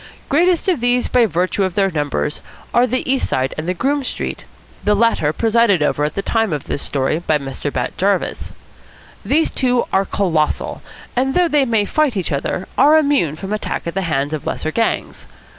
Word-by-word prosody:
Greatest 345 +5 +2
of 360 -7 +2
these 245 +1 +1
by 245 -2 +3
virtue 185 +2 0
of 185 -2 -2
their 195 -2 +2
numbers 150 -1 -2 0.3
are 245 +1 +4
the 255 +1 -2
East 265 0 +1
Side 130 0 0
and 160 +3 -4
the - - +1
Groome 280 +7 0
Street, - - -4 0.4
the 210 +1 +3
latter 205 -9 +2
presided 225 -2 +2
over 145 0 0
at 150 0 -1
the 195 - -2
time 225 -3 0
of 145 - -3
this 140 - -4
story 140 +3 -1
by 155 -3 +1
Mr. 140 0 -5
Bat 125 -2 -3
Jarvis. 195 0 0 0.7
These 315 +3 +2
two 250 -2 +1
are 195 +1 +3
colossal, 165 -7 -1 0.3
and, 265 +2 0
though 360 -1 +4
they 295 -4 +2
may 225 -4 +1
fight 290 -2 +1
each 185 - -2
other, 145 +6 -2
are 305 +2 +6
immune 280 - +2
from 195 +5 -5
attack 215 - -3
at 170 - -3
the 195 - -1
hands 145 -4 -1
of 155 - -4
lesser 155 - -2
gangs. 230 +6 -2
200 Hz, 195 wpm, -18 LUFS, 155-250 Hz, 0.7 s, are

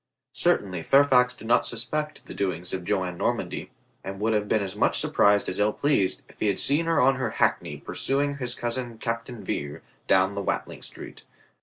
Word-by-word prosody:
Certainly 90 -4 +1
Fairfax 125 +2 +4
did 110 - -12
not 120 +1 +3
suspect 150 +6 -3
the - - -9
doings 90 -3 -2
of 95 -1 -3
Joan 90 -2 -1
Normandy, - - -2 0.3
and 95 0 -6
would 110 +2 +1
have 105 -1 0
been 110 -2 +2
as 95 0 -5
much 105 - +3
surprised 100 0 +3
as 95 - -3
ill 105 +1 +2
pleased 140 -10 +1
if - - -20
he - - +1
had 100 -2 0
seen 150 +4 +2
her 165 - +3
on 135 +1 +4
her 130 - -1
hackney - - +1
pursuing 140 +1 -1
his 125 -1 -2
cousin 120 -1 -3
Captain 115 0 -4
Vere 70 -5 -4 0.2
down 95 +1 +4
the 100 - -3
Watling - - -3
Street. - - -9
110 Hz, 190 wpm, -26 LUFS, 95-130 Hz, 0.3 s, Fairfax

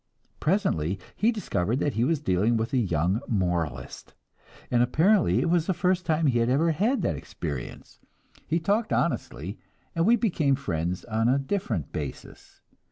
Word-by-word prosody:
Presently 100 - 0 0.2
he 225 +3 +3
discovered 120 - -1
that 145 0 0
he 115 - +1
was 155 +3 +1
dealing 110 -1 +1
with 115 +5 -2
a - - +3
young 90 +1 0
moralist, 85 - -2 0.6
and 120 - +3
apparently 170 - +3
it 170 - 0
was 170 -2 +2
the 190 - +1
first 180 0 0
time 160 0 +2
he 125 -4 +3
had 115 +1 +2
ever 155 +6 +3
had 220 - +1
that - - 0
experience; - - -7 0.5
he 165 +2 +1
talked 210 +6 0
honestly, - - -2 0.3
and 165 +2 +1
we 235 - +6
became 165 - +1
friends 90 - -3
on 115 0 +1
a 130 - +3
different 135 - -2
basis. 70 -4 -8
135 Hz, 165 wpm, -26 LUFS, -, 0.6 s, we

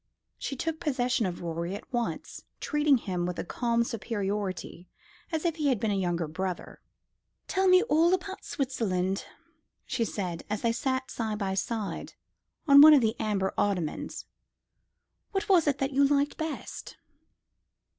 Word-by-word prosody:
She 275 - -3
took 320 +3 -3
possession 250 - 0
of 175 -1 -5
Rorie 170 +2 -3
at 210 - -11
once, 240 -1 -3 0.2
treating 295 -2 +3
him 180 -6 -2
with 180 - -4
a - - -2
calm 235 +4 0
superiority, 200 -5 -4 0.4
as 320 0 -2
if 335 -1 0
he 300 -2 0
had 255 -6 +2
been 220 0 0
a - - +1
younger 175 -4 0
brother. 180 +3 -5 0.7
"Tell 380 0 +1
me 365 +1 +6
all 340 -6 +3
about 375 +1 -2
Switzerland," 195 - -1 0.6
she 260 -3 -1
said, 180 -6 -3
as 210 0 -3
they 230 - +3
sat 260 +2 -2
side 220 -2 -2
by 195 -2 -1
side 210 +1 -3 0.5
on 280 0 +9
one 305 0 +10
of 280 - +5
the 220 0 +1
amber 200 -3 0
ottomans. 185 -7 -2 1.1
"What 390 0 -1
was 355 -6 +4
it 285 -2 +2
that 270 +1 -1
you 280 +2 +4
liked 285 0 +1
best?" 315 -2 -6
230 Hz, 155 wpm, -28 LUFS, 190-290 Hz, 1.1 s, one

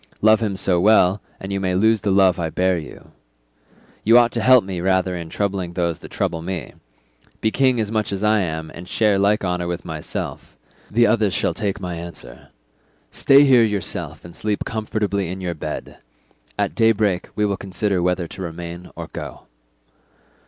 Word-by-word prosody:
Love 110 +1 +5
him 105 -4 -2
so 90 -2 +1
well, 100 0 +4 0.2
and 95 0 -5
you 100 - -1
may 95 -1 -1
lose 110 +3 +3
the 105 - -1
love 95 -2 +4
I 80 -1 -1
bear 95 +2 +1
you. 80 -4 -9 0.9
You 115 +3 +6
ought 120 -1 +5
to 115 - -2
help 130 -1 +6
me 95 -2 -5
rather 95 0 +1
in 85 -2 -6
troubling 95 -3 -2
those 85 -2 -1
that - - -11
trouble 80 - -2
me; 85 -4 -5 0.7
be 110 - +1
king 130 -1 +2
as 110 -1 -1
much 110 -2 -1
as 100 +1 -3
I 105 0 +4
am, 80 -4 -3
and 90 +2 -10
share 105 -2 +2
like 100 0 +2
honour 90 -1 -1
with 85 0 -4
myself; 80 -3 -6 0.3
the 120 +2 +4
others 105 -3 +2
shall - - 0
take 105 -2 -2
my 90 -2 -4
answer; 85 -7 -10 0.6
stay 140 +1 +6
here 130 -4 +6
yourself 105 -6 -3
and 85 - -11
sleep 105 -1 -2
comfortably 105 -4 -2
in 95 +1 -5
your 90 -2 -3
bed; 80 -1 -6 0.6
at - - 0
daybreak 110 -5 +2
we 105 - +1
will 100 -1 0
consider 95 0 -1
whether 90 -1 0
to 95 - -9
remain 85 0 -7
or - - -6
go." - - -7
95 Hz, 185 wpm, -21 LUFS, 90-105 Hz, 0.9 s, You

